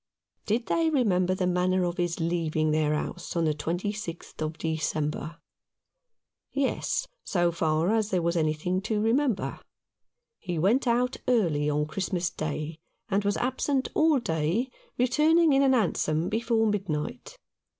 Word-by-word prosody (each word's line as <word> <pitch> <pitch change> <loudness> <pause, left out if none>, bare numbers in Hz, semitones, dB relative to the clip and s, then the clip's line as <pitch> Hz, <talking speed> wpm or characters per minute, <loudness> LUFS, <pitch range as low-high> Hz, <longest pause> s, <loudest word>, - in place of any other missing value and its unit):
Did 230 +3 +1
they 330 -1 +2
remember 185 - +2
the 185 -1 -1
manner 180 +1 +2
of 175 0 -2
his 175 -1 -1
leaving 165 -2 0
their 150 -1 +2
house 175 +4 -4
on 170 -1 +2
the 155 - +2
26th 175 +4 -4
of 155 +1 -3
December? 155 0 -2 1.1
Yes, 280 - -1 0.2
so 175 -3 +1
far 165 +3 +1
as 220 -2 +1
there 180 -4 0
was 170 +1 +1
anything 160 +3 0
to 215 +1 -1
remember. 235 +1 +1 0.8
He 175 -3 -4
went 220 - +2
out 245 +2 +1
early 165 -12 +2
on 150 0 +1
Christmas 175 +1 -2
Day, 155 0 -4 0.3
and 200 0 +1
was 205 +1 +1
absent 260 +1 0
all 315 -2 +4
day, 175 +4 -1 0.3
returning 300 +6 +4
in 270 - +4
a 275 - +4
hansom 175 -9 +1
before 225 0 +1
midnight. 205 - -3
185 Hz, 140 wpm, -27 LUFS, 160-235 Hz, 1.1 s, all